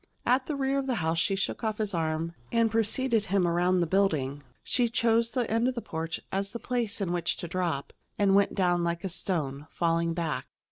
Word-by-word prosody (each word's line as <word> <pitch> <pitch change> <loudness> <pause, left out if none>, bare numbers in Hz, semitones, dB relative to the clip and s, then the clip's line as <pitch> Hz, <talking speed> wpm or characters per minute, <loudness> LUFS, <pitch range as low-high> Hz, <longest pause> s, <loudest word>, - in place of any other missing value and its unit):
At 255 +2 +2
the 300 - -1
rear 275 0 +1
of 270 - -3
the 255 - +1
house 165 -3 0
she 195 +4 +2
shook 195 +4 -2
off 215 -1 -1
his 210 -2 -1
arm 165 0 -1 0.2
and 230 -1 +3
preceded 225 +1 +1
him 190 -2 +2
around 175 +2 +2
the - - +3
building. 155 -7 +1 0.2
She 245 -2 +1
chose 230 0 +2
the 245 -2 -1
end 230 +2 +2
of 255 - -1
the 235 - -3
porch 165 0 -4
as 195 +1 -1
the 235 - -5
place 235 -4 -1
in 185 -3 -1
which 170 -1 0
to 175 - -5
drop, 170 -5 -2 0.2
and 200 -2 +3
went 200 0 +3
down 175 -3 +2
like 170 0 -1
a 190 - -2
stone, 150 -6 -2
falling 165 0 0
back. 165 -3 -2
195 Hz, 220 wpm, -28 LUFS, 170-230 Hz, 0.2 s, and